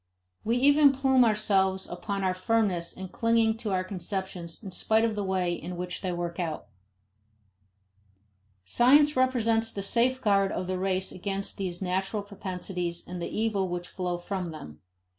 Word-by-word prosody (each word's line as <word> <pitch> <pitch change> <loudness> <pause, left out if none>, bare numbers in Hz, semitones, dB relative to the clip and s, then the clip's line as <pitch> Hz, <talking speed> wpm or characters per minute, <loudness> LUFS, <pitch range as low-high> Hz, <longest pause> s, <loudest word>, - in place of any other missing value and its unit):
We 230 +3 +1
even 285 +2 +6
plume 265 -1 +4
ourselves 195 -4 +2
upon 195 +3 -4
our 185 -1 +2
firmness 185 -3 0
in 190 -1 -6
clinging 230 0 +2
to 225 -2 -4
our 185 -1 +1
conceptions 185 -1 -5
in 195 - -7
spite 220 +4 +2
of 225 - 0
the 205 -1 -2
way 185 -2 0
in 175 +1 -6
which 180 0 -4
they 185 - -2
work 175 0 -4
out. 165 -3 -3 2.0
Science 290 - +5
represents 230 -3 +2
the 200 - -5
safeguard 215 -3 +2
of 180 - -3
the 185 0 -2
race 190 0 0
against 195 +1 -4
these 185 -1 -4
natural 190 +3 -1
propensities 180 -3 -5
and 180 0 -6
the - - -3
evils 210 -4 0
which 175 0 -4
flow 180 -1 -3
from 180 0 -4
them. 80 - -10
195 Hz, 160 wpm, -28 LUFS, 180-225 Hz, 2.0 s, even